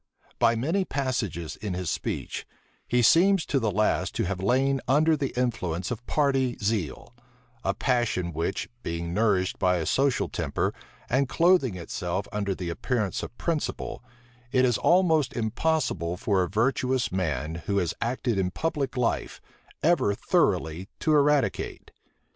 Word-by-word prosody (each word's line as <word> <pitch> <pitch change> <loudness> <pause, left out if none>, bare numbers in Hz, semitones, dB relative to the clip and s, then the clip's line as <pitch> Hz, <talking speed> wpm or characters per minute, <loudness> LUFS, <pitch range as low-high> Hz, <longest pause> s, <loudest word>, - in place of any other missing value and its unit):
By 115 - +4
many 160 - 0
passages 120 - -3
in 100 -4 -4
his 90 -2 -2
speech, - - -4 0.4
he 125 0 +2
seems 180 - +5
to 140 - +1
the 115 -3 0
last 105 +2 +1
to - - 0
have 95 0 -2
lain 135 +5 +2
under 155 +5 +4
the 140 -3 -2
influence 90 -8 -1
of 120 0 -4
party 135 -4 +1
zeal; 100 - -2 0.5
a - - 0
passion 120 - 0
which, 85 +5 -2
being 85 0 -4
nourished 100 -3 +1
by 90 -1 +3
a 80 - -2
social 135 - +2
temper, - - -2 0.3
and 135 +1 +1
clothing 170 - +3
itself 90 +2 -3
under 100 -2 -1
the 90 -2 -4
appearance 105 +2 -1
of - - -8
principle, 165 -6 -3 0.5
it 130 -1 +4
is 120 -4 +1
almost 165 -6 +3
impossible 110 - -1
for 95 0 +1
a 90 - -1
virtuous 125 +3 +1
man, 80 -3 -2
who 100 - +1
has 90 -4 0
acted 120 -2 -1
in 90 -1 +1
public 145 - -2
life, 120 -2 -1 0.4
ever 155 -11 +3
thoroughly 85 0 0
to 155 - +2
eradicate. 150 -1 +1
115 Hz, 150 wpm, -27 LUFS, 90-135 Hz, 0.5 s, seems